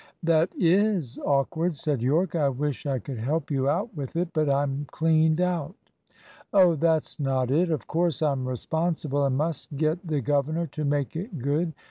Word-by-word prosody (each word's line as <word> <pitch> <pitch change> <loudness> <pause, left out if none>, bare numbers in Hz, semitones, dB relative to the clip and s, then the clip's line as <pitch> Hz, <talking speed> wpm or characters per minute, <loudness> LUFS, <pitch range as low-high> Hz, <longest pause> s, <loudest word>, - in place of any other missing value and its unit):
"That 165 +1 +3
is 180 - +2
awkward," 155 +4 0
said 145 -5 -1
Yorke. 155 +8 +1
"I 150 -5 +2
wish 145 +2 -3
I 135 -2 0
could 125 -1 -6
help 145 +7 -2
you 135 -1 +1
out 190 +8 -1
with 140 -2 -6
it, 175 +1 0
but 155 -2 +1
I'm 140 +1 0
cleaned 160 0 +2
out." 180 -2 -1 0.8
"Oh, 185 -4 +6
that's 160 0 0
not 130 -3 0
it. 170 +5 +2
Of 155 -6 -2
course 165 -2 0
I'm 135 -4 0
responsible, 150 +2 -1
and 135 -1 +1
must 155 -1 -3
get 160 +4 0
the 155 -2 0
governor 145 +6 0
to 155 0 -6
make 145 -1 -1
it 180 +1 -5
good. 150 +6 -1
155 Hz, 175 wpm, -26 LUFS, 140-165 Hz, 0.8 s, Oh